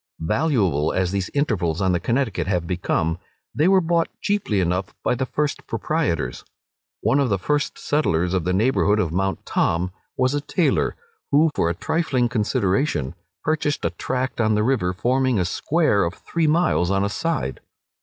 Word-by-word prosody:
Valuable 95 - +1
as 90 -1 0
these 95 -2 -2
intervals 90 - 0
on 95 -1 +2
the 90 - +1
Connecticut 115 0 -1
have 90 -3 0
become, 85 -1 -1 0.3
they 155 - +2
were 190 0 +5
bought 170 -1 +1
cheaply 200 - 0
enough 90 +1 -1
by - - +2
the 130 +1 -2
first 150 +3 -2
proprietors. 85 - -1 0.6
One 140 - +2
of 135 -3 +2
the 100 - +2
first 145 +10 -1
settlers 90 - 0
of 95 -3 +1
the 90 - 0
neighbourhood 105 +1 +2
of 90 -7 0
Mount 95 +3 -1
Tom, 90 +2 0 0.3
was 130 +1 +2
a 145 - 0
tailor, 165 +3 +1 0.3
who, 150 +2 +4
for 85 - +1
a 85 - -2
trifling 130 - 0
consideration, 105 - 0 0.3
purchased 150 -1 0
a - - +1
tract 130 -1 -2
on 110 -1 +2
the 105 - +2
river, 110 -7 +1
forming 130 +5 +1
a 90 - +1
square 145 - +1
of 85 +2 -2
three 165 -2 -1
miles 155 - +2
on 95 0 +1
a - - +1
side. 155 - -2
110 Hz, 175 wpm, -22 LUFS, 90-145 Hz, 0.6 s, were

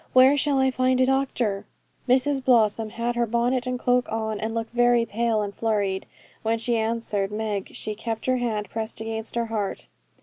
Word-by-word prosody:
Where 260 +2 +7
shall 285 -1 +2
I 265 0 +3
find 255 0 +1
a 255 - +5
doctor?' 255 -6 0 0.5
Mrs 265 +2 +2
Blossom 225 -3 +3
had 235 +2 -2
her 240 -1 +1
bonnet 245 +2 0
and 250 0 -1
cloak 245 0 +1
on, 220 -1 -2
and 220 +1 -2
looked 225 0 -3
very 240 -1 +4
pale 225 -1 0
and 200 -1 -5
flurried. 200 -4 -1 0.3
When 225 +1 0
she 235 +1 0
answered 220 -3 -1
Meg 210 -2 -3
she 215 - -4
kept 225 +1 -4
her 255 0 +2
hand 220 -4 -2
pressed 220 -1 -4
against 225 0 -5
her 235 0 0
heart. 215 -3 -3
230 Hz, 190 wpm, -25 LUFS, 220-250 Hz, 0.5 s, Where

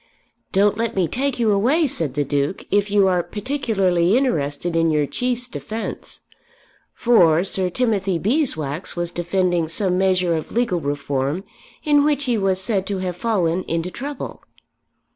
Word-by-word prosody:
"Don't 205 +2 +2
let 230 -1 -1
me 185 -3 +2
take 270 - -1
you 230 -3 +2
away," 255 +12 +3
said 160 - -2
the 145 - +1
Duke, 140 +5 -2
"if 205 0 +2
you 200 -1 +4
are 180 -2 +2
particularly 205 -5 +1
interested 165 - -1
in 165 0 +3
your 150 -2 +2
Chief's 245 - -2
defence," 225 -2 -6 0.7
for 175 -9 +4
Sir 190 -1 -1
Timothy 200 -4 0
Beeswax 180 - -1
was 175 -1 -2
defending 175 -1 0
some 180 +2 0
measure 185 -3 +2
of 155 - -5
legal 235 -7 0
reform 140 +3 -2 0.4
in 290 -1 +4
which 290 -1 +1
he 245 -2 +1
was 195 -3 +1
said 190 -1 0
to 200 - -2
have 185 -2 -3
fallen 180 -4 0
into 165 +2 -2
trouble. 280 +5 -6
190 Hz, 155 wpm, -21 LUFS, 170-230 Hz, 0.7 s, you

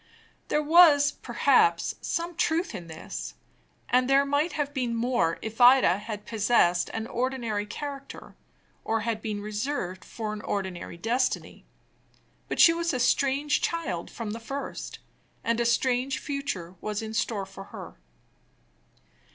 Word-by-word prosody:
There 300 - +1
was, 300 -2 +6
perhaps, 435 -2 +2
some 340 +1 -2
truth 335 0 0
in 175 -5 -7
this; 160 0 -7 0.5
and 250 +1 +2
there 275 +1 +5
might 290 +3 0
have 290 -1 -2
been 250 -4 -1
still 230 - -2
more, 235 -9 +1
if 220 +2 -5
Ida 245 -6 +7
had 210 -1 -7
possessed 205 -6 +2
an 225 0 -4
ordinary 235 -4 -2
character, 280 +3 -7 0.5
or 225 0 0
had 220 0 -2
been 210 -2 -4
reserved 210 -3 -3
for 215 -2 -5
an 210 - -6
ordinary 190 -5 -4
destiny. 240 +7 -1 0.8
But - - -3
she 330 - +8
was 335 -3 -1
a - - -1
strange 275 +3 +2
child 325 - -2
from 225 -3 -5
the 225 - -5
first, 275 +5 -6 0.5
and 230 0 0
a 235 - +1
strange 255 +2 +1
future 265 - -4
was 210 0 -3
in 220 0 -6
store 215 -3 -1
for 195 0 -11
her. - - -9
235 Hz, 145 wpm, -27 LUFS, 210-280 Hz, 0.8 s, she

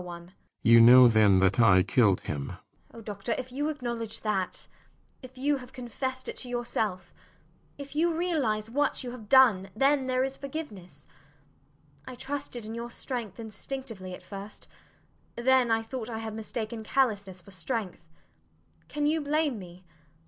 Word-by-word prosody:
JENNIFER 175 0 -9 0.3
[suddenly 115 +1 +7
moved 120 0 +8
and 95 -3 +5 0.4
softened] 90 - +1 0.3
Oh, 230 - -11
doctor, 210 +1 -4
if 255 0 -6
you 290 +4 -1
acknowledge 235 -6 -4
that 195 -4 -2 0.6
if 255 -1 -13
you 285 +2 +1
have 250 -1 -11
confessed 260 +1 -4
it - - -4
to 250 - -5
yourself 225 -6 -3 0.6
if 280 0 -9
you 335 +3 +2
realize 300 -11 0
what 280 +4 0
you 245 - -5
have 225 -4 -11
done, 230 -8 +5
then 270 +2 +2
there 255 0 +1
is 270 0 -3
forgiveness. 205 - -8 1.0
I 255 - -7
trusted 265 -3 -5
in 220 - -6
your 235 +1 -5
strength 235 -5 -5
instinctively 220 -3 -6
at - - -15
first; 200 +1 -9 0.7
then 255 0 +3
I 225 0 +2
thought 240 0 -6
I 225 - -4
had 220 -1 -5
mistaken 220 0 -5
callousness 205 -7 0
for 190 +3 -14
strength. 190 +1 -4 0.9
Can 295 0 -2
you 310 +2 +2
blame 290 -4 0
me? 180 0 -12
230 Hz, 150 wpm, -28 LUFS, 195-265 Hz, 1.0 s, moved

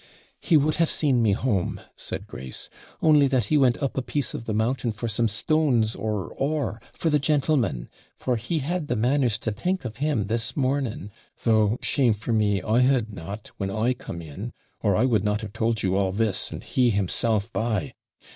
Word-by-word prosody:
'He 165 - +4
would 150 +1 +2
have 165 -1 +3
seen 135 -6 +2
me 110 -3 +3
home,' 100 -5 0 0.2
said - - -4
Grace,' 65 +1 -8 0.3
only 150 -3 +6
that 130 -3 +2
he 155 - +2
went 125 -3 +4
up 135 - -1
a 135 - 0
piece 145 +1 -1
of 115 - -6
the 110 - -3
mountain 115 +2 0
for 110 +2 -4
some 115 +1 +1
stones 120 -1 +2
or 105 -3 -3
ore 135 -7 -1
for 165 - -1
the 150 - +4
gentleman 140 - +1 0.3
for 125 - -1
he 125 +9 -2
had 175 -1 -2
the - - 0
manners 120 0 +2
to 110 - -3
think 180 - -2
of 115 -3 -5
him 140 -8 0
this 115 +5 -2
morning, 130 -7 -1 0.3
though, 110 -1 +3
shame 125 -6 +2
for 115 +3 -3
me, 105 -3 +2
I 110 +2 +2
had 125 -4 +2
not, 100 +4 -7
when 95 - -2
I 110 +5 +1
come 85 -8 -8
in, 95 +10 -7 0.3
or 100 -3 +2
I 125 - +3
would 110 -6 +2
not 105 +1 0
have 105 -2 -7
told 115 -1 0
you 95 -1 +1
all 95 -1 +1
this, 105 0 0
and - - -7
he 125 -2 +2
himself 105 +2 0
by. 110 -5 -1
115 Hz, 200 wpm, -25 LUFS, 105-135 Hz, 0.3 s, only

